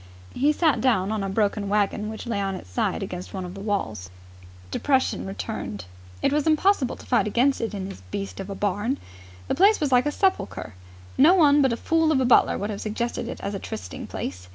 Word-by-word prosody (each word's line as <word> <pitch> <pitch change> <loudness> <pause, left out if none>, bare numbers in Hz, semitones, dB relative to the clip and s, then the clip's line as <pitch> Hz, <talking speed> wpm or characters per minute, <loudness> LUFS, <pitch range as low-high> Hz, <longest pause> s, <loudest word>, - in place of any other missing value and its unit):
He 285 +3 +3
sat 310 0 +2
down 215 -6 +2
on 215 -2 -1
a 195 - -2
broken 200 0 0
wagon 210 +1 0
which 220 +2 -7
lay 225 -4 -1
on 195 -1 -2
its 90 - -10
side 90 - -1
against 180 0 -6
one 185 -1 -4
of 180 - -7
the 195 - -9
walls. 110 - -2 0.6
Depression 265 - +1
returned. 195 - -5 0.4
It - - +3
was 300 +1 +1
impossible 315 -3 +3
to - - -14
fight 240 -4 +2
against 255 +6 +2
it 225 -2 -3
in 190 -1 -4
this 195 - -9
beast 95 0 -5
of 190 - -6
a 200 - -4
barn. 205 +7 -1 0.5
The - - 0
place 405 +4 +5
was 295 -3 0
like 250 +2 +4
a - - +1
sepulchre. 380 - -1 0.5
No 320 +7 +7
one 295 -5 +5
but 265 -3 +3
a 235 - -1
fool 325 +2 +2
of 285 - +3
a 260 - +2
butler 245 - +5
would 205 +2 -3
have 200 - -5
suggested 235 +2 -3
it 245 - -6
as 200 - -3
a 195 - -3
trysting 95 - -7
place. 90 0 -6
220 Hz, 225 wpm, -25 LUFS, 195-275 Hz, 0.6 s, No